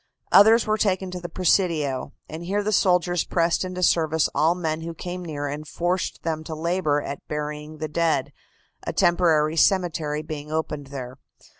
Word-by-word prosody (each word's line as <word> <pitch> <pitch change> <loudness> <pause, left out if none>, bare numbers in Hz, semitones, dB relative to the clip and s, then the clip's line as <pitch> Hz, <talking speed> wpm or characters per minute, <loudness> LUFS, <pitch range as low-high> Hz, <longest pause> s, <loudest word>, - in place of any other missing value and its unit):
Others 220 +3 +7
were 215 0 0
taken 190 -2 0
to 180 - -5
the 175 0 -7
Presidio, 165 -6 +1 0.2
and 160 +2 -7
here 200 +4 -1
the 215 - -1
soldiers 180 -3 +2
pressed 170 +1 +1
into 185 0 -4
service 160 -2 +3
all 165 +3 +3
men 160 -3 -2
who 165 0 -6
came 180 +2 -6
near 150 -4 -4
and 145 +2 -5
forced 175 +3 -2
them 160 -1 -2
to 160 - -5
labor 160 -2 0
at 140 - -5
burying 150 +1 -5
the 155 - -3
dead, 155 -3 0 0.5
a - - -4
temporary 165 -3 +3
cemetery 160 -4 +1
being 150 -1 -7
opened 150 -3 -3
there. 130 -1 -7
165 Hz, 170 wpm, -24 LUFS, 150-180 Hz, 0.5 s, Others